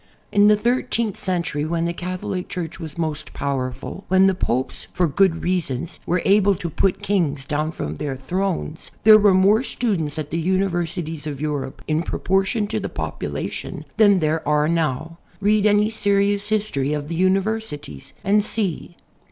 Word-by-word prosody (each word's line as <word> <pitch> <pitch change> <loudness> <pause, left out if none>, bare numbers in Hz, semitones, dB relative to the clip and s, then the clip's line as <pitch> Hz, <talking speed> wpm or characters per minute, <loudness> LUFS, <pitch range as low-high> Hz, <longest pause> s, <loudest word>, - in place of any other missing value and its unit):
In 205 0 +5
the 210 - +7
thirteenth 235 -1 0
century, 170 -5 -2
when 165 +2 -1
the 170 - -1
Catholic 185 +1 -4
Church 175 -3 -5
was 160 -3 -7
most 155 -3 -3
powerful, 135 +6 -3
when 190 0 +5
the 195 - +4
Popes 130 -8 -2
for 180 - +1
good 165 +2 +2
reasons. 170 -5 -2
were 175 0 +1
able 200 0 +4
to 170 -1 -5
put 190 +4 0
kings 155 -8 0
down 150 +2 -1
from 75 - -4
their 135 - -4
thrones, 170 +3 -3
there 215 0 +9
were 205 -2 +5
more 200 +4 +5
students 195 - -2
at 150 -2 -4
the 165 - -1
universities 175 -3 -1
of 145 -2 -4
Euroi)e, 145 -2 -3
in 155 +1 +1
proportion 195 +5 0
to 210 - -2
the - - -4
population, - - -5
than 205 -3 +6
there 160 -1 +1
are 150 0 +3
now. 165 0 -1 0.2
Read 210 +1 +3
any 210 +1 +3
serious 200 -1 +1
history 200 -10 0
of 150 -1 -3
the 170 - -4
universities 190 - -1
and 205 +2 +3
see. 195 -5 -3
180 Hz, 165 wpm, -22 LUFS, 155-200 Hz, 0.2 s, there